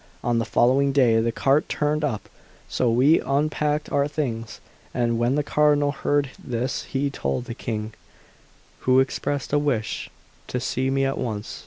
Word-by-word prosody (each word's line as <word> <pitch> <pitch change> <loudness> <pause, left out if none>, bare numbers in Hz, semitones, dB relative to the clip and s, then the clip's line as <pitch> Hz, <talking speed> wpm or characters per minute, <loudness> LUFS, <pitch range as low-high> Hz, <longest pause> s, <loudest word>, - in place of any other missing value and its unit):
On 120 -1 +1
the 115 - -1
following 135 +3 +3
day 120 -5 +4
the 115 +1 0
cart 135 +5 +2
turned 150 +1 0
up; 125 -8 -2 0.4
so 125 - 0
we 130 +8 +4
unpacked 150 +1 0
our 140 0 +2
things, 115 -8 -4 0.4
and 120 -2 +1
when 120 +3 +2
the 150 - +1
Cardinal 145 -1 +3
heard 145 -1 0
this 125 +1 -2
he 140 +1 -1
told 70 - -2
the 120 - -5
King, 110 -2 -4 0.9
who 130 0 +4
expressed 135 +1 -1
a 145 - +4
wish 125 -8 -2 0.4
to 125 - -2
see 130 +2 -1
me 135 0 +1
at 135 - -1
once. 110 -4 -4
135 Hz, 165 wpm, -24 LUFS, 120-145 Hz, 0.9 s, day